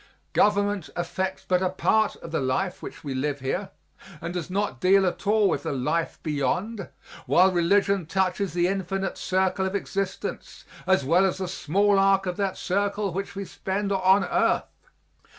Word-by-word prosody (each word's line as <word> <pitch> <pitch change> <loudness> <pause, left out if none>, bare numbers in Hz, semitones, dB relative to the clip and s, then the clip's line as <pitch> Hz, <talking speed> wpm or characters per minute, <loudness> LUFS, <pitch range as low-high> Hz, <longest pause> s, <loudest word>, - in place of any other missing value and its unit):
Government 205 -3 +2
affects 190 +2 -3
but 180 -1 +2
a 185 - +1
part 215 +4 +1
of 165 - -10
the 160 - 0
life 145 +8 -1
which - - -9
we 140 -3 -4
live 140 +2 -2
here 180 +9 -3 0.5
and 170 +2 -5
does 180 -1 -4
not 200 +2 -2
deal 190 +1 +5
at 185 +2 -3
all 210 0 +4
with - - 0
the - - -3
life 140 +5 -1
beyond, 170 - -2 0.4
while 185 +2 +5
religion 190 +1 +2
touches 190 +1 0
the 175 0 +2
infinite 195 0 -2
circle 190 0 0
of 190 - -4
existence 195 -1 -4 0.2
as 190 -8 +3
well 170 +7 +4
as 190 - +1
the 190 -1 -3
small 195 +3 +2
arc 195 0 +3
of 180 -1 -2
that 195 -2 -1
circle 200 0 -1
which 200 +2 -4
we 200 0 -4
spend 195 +2 -3
on 190 +1 +4
earth. - - -1
190 Hz, 170 wpm, -25 LUFS, 175-200 Hz, 0.5 s, deal